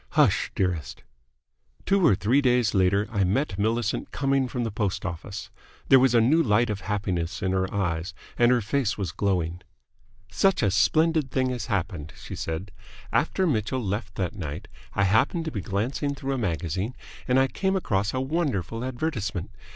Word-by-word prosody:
"Hush, - - +4
dearest!" 90 -5 -2 0.8
Two 195 -1 +3
or 140 - +6
three 115 +8 +2
days 125 -4 +3
later 100 +2 +3
I 100 -3 +1
met 100 +2 0
Millicent 110 +1 0
coming 135 -1 +1
from 125 0 -3
the 115 - -2
post 105 -2 -2
office. 95 +3 -6 0.4
There 135 - +8
was 125 -1 +4
a - - +7
new 140 +9 +4
light 115 -3 +2
of 100 -1 -4
happiness 95 -3 -2
in 95 - +1
her 95 0 0
eyes, 90 -2 -2 0.2
and 120 0 +4
her 125 -1 +3
face 115 0 0
was 95 -5 -2
glowing. 90 -3 -1 0.7
"Such 195 -9 +2
a 100 - +3
splendid 155 - +3
thing 130 0 0
has 125 -1 -4
happened," 90 - -3
she - - -9
said. 80 +5 -4 0.4
"After 190 - +2
Mitchell 130 - 0
left 105 0 -3
that 90 -2 -2
night 75 -8 -6 0.3
I 100 - +3
happened 115 - +2
to 160 - -3
be 105 - -3
glancing 120 - -2
through 135 0 -3
a - - -1
magazine, 95 +3 -2 0.3
and 125 +1 +4
I 135 - +5
came 190 +8 -1
across 105 - 0
a 130 - -2
wonderful 130 - -1
advertisement. 120 - -3
105 Hz, 175 wpm, -26 LUFS, 95-130 Hz, 0.8 s, There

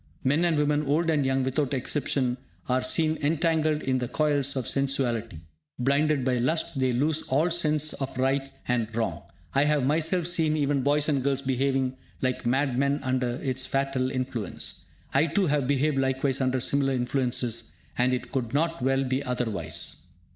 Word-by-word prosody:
Men 145 +6 +2
and 165 -3 +2
women, 150 0 +2
old 165 +4 +2
and 150 -3 +2
young, 135 0 +1
without 135 +1 0
exception, 130 -1 0 0.3
are 130 0 +1
seen 155 +5 +1
entangled 155 0 +1
in 130 -1 +1
the 125 - -2
coils 145 -1 0
of 130 -4 -2
sensuality. 120 - -1 0.4
Blinded 140 +2 +2
by 130 -1 +2
lust, 160 +3 -1
they 130 -1 +2
lose 145 +6 +1
all 155 +6 +2
sense 155 -3 +2
of 135 -2 -5
right 135 +1 +1 0.2
and 120 -3 +1
wrong. 115 -1 -1 0.3
I 140 - +3
have 150 -3 +2
myself 160 +4 +2
seen 160 -3 +2
even 145 -2 +1
boys 145 +2 +2
and 140 -3 +1
girls 140 0 0
behaving 130 0 0 0.2
like 130 -2 -1
mad 130 0 +1
men 140 +1 +1
under 130 -2 0
its 130 -1 0
fatal 135 -1 0
influence. 130 -6 -4 0.3
I 140 +4 +4
too 195 +5 +1
have 145 -4 +1
behaved 140 +1 +1
likewise 135 0 +1
under 130 0 +1
similar 135 +1 +1
influences, 125 -2 -1 0.2
and 125 +1 +2
it 125 - -3
could 125 -2 -2
not 165 0 0
well 135 +1 +2
be 130 +1 -1
otherwise. 110 - -2
135 Hz, 170 wpm, -27 LUFS, 130-150 Hz, 0.4 s, I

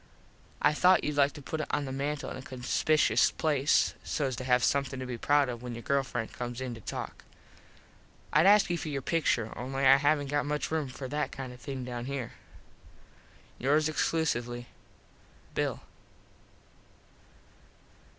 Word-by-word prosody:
I - - +5
thought 180 +4 +5
youd 150 0 -1
like 140 0 +4
to 145 - -10
put 155 +3 -3
it - - -4
on 145 - 0
the 135 - -5
mantle 140 +2 -3
in - - -6
a - - -7
conspikuous 135 +4 +2
place 150 -2 +2
sos 135 -4 -1
to 130 - -4
have 125 -1 +3
somethin 140 -1 +1
to 130 - -4
be 125 -1 -4
proud 145 +2 +3
of 120 -2 -5
when 125 -1 -6
your 120 - -8
girl 140 0 +2
friend 120 -4 -5
comes 120 0 -5
in 130 -2 -4
to 115 - -10
talk. - - -6 1.1
Id 160 +5 +5
ask 205 0 +6
you 170 - 0
for 155 - -4
your 140 -2 -3
pictur 125 -9 0
only 135 +2 -2
I 135 +1 +8
havnt 145 0 +2
got 145 0 0
much 150 +1 -2
room 155 -3 0
for 130 +1 -7
that 150 +2 -2
kind 130 -2 -7
of 125 - -14
thing 135 -3 -5
down 120 -1 -5
here. 135 -3 -4 1.3
yours 150 +4 +3
exclusively 120 -7 -1 0.9
_Bill. - - -1
135 Hz, 170 wpm, -30 LUFS, 125-150 Hz, 1.3 s, I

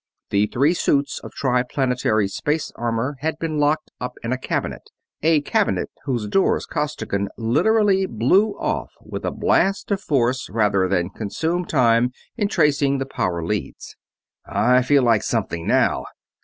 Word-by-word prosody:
The 100 +1 +3
three 140 +9 +2
suits 140 -5 0
of - - -10
Triplanetary 125 -4 0
space 150 +10 -2
armor 120 +4 -2
had 155 +2 -2
been 155 -2 -2
locked 150 +1 +1
up 125 - -4
in 115 +2 -1
a - - -1
cabinet; - - -3 0.3
a 160 -1 +3
cabinet 215 +7 0
whose 120 -6 -1
doors 190 - +1
Costigan 100 -9 -2
literally 195 - +2
blew 185 - +2
off - - -2
with - - -7
a - - +1
blast 195 +2 +1
of 200 -1 0
force 130 -4 0
rather 100 -3 +2
than 90 -1 0
consume 160 - -2
time 120 -4 +3 0.3
in 210 -3 0
tracing 145 -6 +2
the 135 - -2
power 85 -10 -2
leads. 90 -7 -4 0.5
"I 125 +1 +3
feel 135 +1 +3
like 115 -4 +3
something 85 -1 -2
now!" - - +2
130 Hz, 150 wpm, -22 LUFS, 115-155 Hz, 0.5 s, The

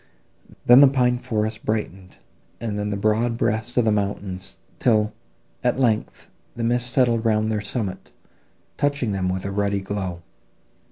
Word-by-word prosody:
Then, 125 +3 +8
the 140 - +9
pine 125 -2 +2
forests 110 -2 -2
brightened, 95 -4 -3 0.4
and 110 -2 -3
then 105 0 -2
the 100 - -2
broad 110 +3 +1
breast 110 +2 -1
of 120 - +4
the 110 - +3
mountains, 100 -2 -3 0.2
till, 110 -3 +2 0.5
at 125 +1 +1
length, 115 -5 0 0.3
the 120 - -4
mist 120 +1 +1
settled 120 -3 +2
round 110 -1 +1
their 105 -1 -1
summit, 100 -2 -4 0.7
touching 145 -6 0
them 95 -2 -1
with 95 +1 -3
a 100 - -3
ruddy 100 0 0
glow. 95 -3 -4
110 Hz, 155 wpm, -23 LUFS, 100-120 Hz, 0.7 s, the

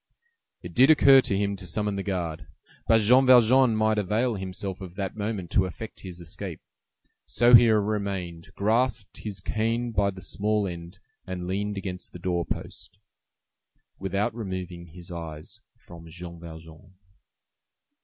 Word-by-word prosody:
It - - -8
did 130 +3 +5
occur 140 -3 +7
to 100 - -1
him 100 0 0
to 95 -1 -8
summon 105 +4 -1
the 100 - -2
guard, 90 -5 -4 0.4
but 115 -1 +5
Jean 125 +5 +5
Valjean 125 -1 +6
might 110 0 +2
avail 110 +5 0
himself 95 -1 -5
of 90 -2 -9
that 95 -1 -4
moment 105 -4 -4
to 95 -1 +3
effect 110 +5 -9
his 90 -2 -9
escape; 85 -2 -7 0.7
so 120 +2 +3
he 120 -1 +9
remained, 100 -5 -1
grasped 110 0 0
his 100 -3 -6
cane 115 +4 -1
by 100 -2 +1
the 95 -1 -8
small 105 +1 -1
end, 85 -1 -8 0.3
and 90 -1 -5
leaned 100 +2 -2
against 90 -2 -6
the - - -7
door 90 0 -1
post, - - -7 1.0
without 100 +2 -1
removing 95 -5 -6
his 85 +2 -11
eyes 80 -3 -8 0.2
from 85 -1 -13
Jean 85 0 -9
Valjean. 80 +3 -12
100 Hz, 150 wpm, -26 LUFS, 90-110 Hz, 1.0 s, he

